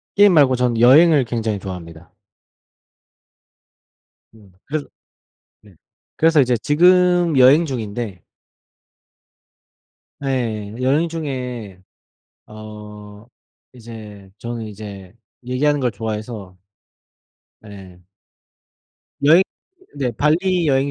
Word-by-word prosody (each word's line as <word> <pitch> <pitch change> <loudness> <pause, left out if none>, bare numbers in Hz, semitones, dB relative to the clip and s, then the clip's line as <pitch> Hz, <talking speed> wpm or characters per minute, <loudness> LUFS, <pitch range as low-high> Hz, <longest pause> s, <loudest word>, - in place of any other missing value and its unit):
게임 205 -1 +6
말고 140 -5 +4
전 125 -2 0
여행을 145 +4 +6
굉장히 115 -3 -3
좋아합니다. 90 -3 -10 2.2
음 105 -4 -19
그래서 150 0 -4 0.8
네 105 -3 -20 0.4
그래서 160 -1 +4
이제 125 -2 +2
지금 175 +2 +3
여행 135 +6 +6
중인데 110 - -5 2.0
네. 115 -7 -3
여행 140 +6 +1
중에 125 - -6 0.7
어 105 -1 -12 0.5
이제 110 -5 -12
저는 115 -1 -6
이제 100 -3 -10 0.3
얘기하는 140 +4 0
걸 125 -2 0
좋아해서 105 -2 -6 1.1
네. 95 -3 -13 1.2
여행 165 +6 +6 0.5
네 135 -3 -2
발리 170 - +1
여행 135 0 +1
120 Hz, 180 characters per minute, -19 LUFS, 105-145 Hz, 2.2 s, 게임